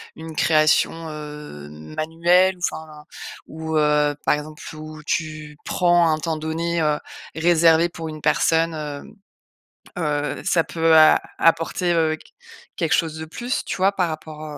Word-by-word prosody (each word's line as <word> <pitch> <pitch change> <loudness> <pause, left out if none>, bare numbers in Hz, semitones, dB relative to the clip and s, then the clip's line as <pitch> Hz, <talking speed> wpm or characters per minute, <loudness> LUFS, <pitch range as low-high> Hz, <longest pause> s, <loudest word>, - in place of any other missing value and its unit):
une 160 0 -9
création, 155 +1 +2
heu, 150 - -9
manuelle, 165 - +1
ou, - - -20
enfin, 155 -1 -10 0.4
ou, 160 0 -4
heu, 150 -1 +2
par - - +4
exemple 150 +1 -8
où 155 0 -9
tu 155 -2 -3
prends 175 -1 +3
un 155 - -2
temps 160 0 -2
donné, 165 +2 -2
heu, 150 -1 +1 0.4
réservé 165 0 +4
pour 165 -1 -7
une 155 -1 -8
personne, 165 +2 +2
heu, 150 -2 -5 1.0
heu, 150 -3 -2
ça 175 -3 +2
peut 165 -1 +2
a 155 -1 +7 0.2
apporter, 165 +2 +2
heu, 160 -1 +2
qu - - -20 0.5
quelque - - +1
chose 160 -2 0
de 160 - -6
plus, 240 - -4
tu - - -4
vois, 190 +1 +3
par 185 -3 0
rapport 155 -1 -7
au - - -7
160 Hz, 155 wpm, -22 LUFS, 150-165 Hz, 1.0 s, a